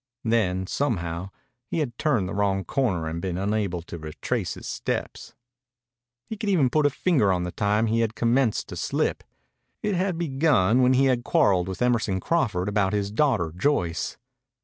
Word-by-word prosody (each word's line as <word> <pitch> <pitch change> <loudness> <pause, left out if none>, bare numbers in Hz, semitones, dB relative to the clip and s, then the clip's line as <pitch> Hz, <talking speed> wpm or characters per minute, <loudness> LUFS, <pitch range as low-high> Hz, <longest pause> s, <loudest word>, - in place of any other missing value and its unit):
Then, 100 -6 +1
somehow, 90 -8 -2 0.4
he - - -3
had 140 -7 -2
turned 125 -12 +1
the - - -5
wrong 100 -1 0
corner 95 -6 -1
and 80 +1 -4
been 90 -1 -3
unable 100 -3 -1
to 85 0 -8
retrace 75 -1 -3
his - - -10
steps. - - -4 0.9
He 220 - -6
could 210 -1 -2
even 150 -10 +3
put 150 -2 +3
a - - +2
finger 140 - +2
on 90 -1 0
the 90 - -4
time 105 +4 +1
he 115 +1 +1
had 115 -1 0
commenced 120 0 +1
to - - -6
slip. - - -1 0.6
It 210 - 0
had 185 -1 0
begun 135 - +2
when 125 +1 +4
he 135 +1 +4
had 125 -2 +2
quarreled 90 -6 +2
with 95 +5 -3
Emerson 115 -6 +1
Crawford 105 - 0
about 100 -1 +1
his 100 -1 -1
daughter 110 - +1
Joyce. 90 - 0
110 Hz, 175 wpm, -25 LUFS, 95-135 Hz, 0.9 s, when